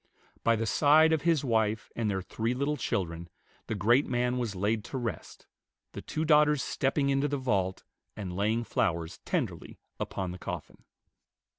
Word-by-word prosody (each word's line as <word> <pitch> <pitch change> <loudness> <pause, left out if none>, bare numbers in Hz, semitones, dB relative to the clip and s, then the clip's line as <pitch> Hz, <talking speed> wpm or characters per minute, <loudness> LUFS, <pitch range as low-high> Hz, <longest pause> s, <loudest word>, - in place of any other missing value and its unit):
By 115 - +4
the 115 +1 -1
side 155 +7 +5
of 160 - +1
his 165 -3 +2
wife 110 -2 0
and 115 -2 0
their 95 -2 -1
three 115 +5 -2
little 140 +3 0
children 85 - -3 0.4
the 110 - -2
great 120 +8 +3
man 125 0 0
was 115 -5 -2
laid 105 +3 0
to 135 - -5
rest, 115 -8 -5 0.5
the - - -7
two 155 - -3
daughters 150 -2 +4
stepping 140 0 0
into 135 +1 +2
the 145 0 -1
vault, 100 -8 -1 0.3
and 95 -4 -5
laying 110 +4 +1
flowers 85 -6 -1
tenderly - - -3 0.2
upon 95 -2 -3
the 90 - -8
coffin. - - -7
115 Hz, 165 wpm, -29 LUFS, 100-140 Hz, 0.5 s, side